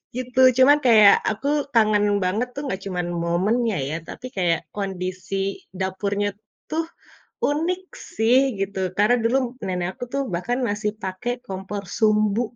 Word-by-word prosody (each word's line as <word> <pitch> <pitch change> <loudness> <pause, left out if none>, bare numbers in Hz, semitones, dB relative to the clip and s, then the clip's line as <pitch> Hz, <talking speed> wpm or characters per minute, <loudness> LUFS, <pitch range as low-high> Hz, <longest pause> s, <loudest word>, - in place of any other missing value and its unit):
Gitu, 255 0 -3 0.2
cuman 275 +3 +7
kayak 215 -4 +8 0.2
aku 220 +6 -3 0.3
kangen 215 -2 +4 0.2
banget 210 +7 0
tuh 280 - -4
nggak 190 -8 -3
cuman 180 -2 -3 0.2
momennya 210 +7 +1
ya, 155 - -3
tapi - - -9
kayak 170 -2 +2 0.2
kondisi 190 -1 -4 0.4
dapurnya 200 +2 -1 0.4
tuh 325 +1 0 0.6
unik 335 +6 0 0.3
sih 225 +3 +3 0.2
gitu. 195 0 -3 0.2
Karena 210 +4 +4
dulu 240 +4 +3 0.3
nenek 180 -1 -1
aku - - -8
tuh 275 - +1
bahkan 240 +9 -1
masih 210 +1 -1
pakai 190 +6 -3
kompor 195 +1 -5
sumbu 215 0 +3
210 Hz, 140 wpm, -23 LUFS, 190-245 Hz, 0.6 s, kayak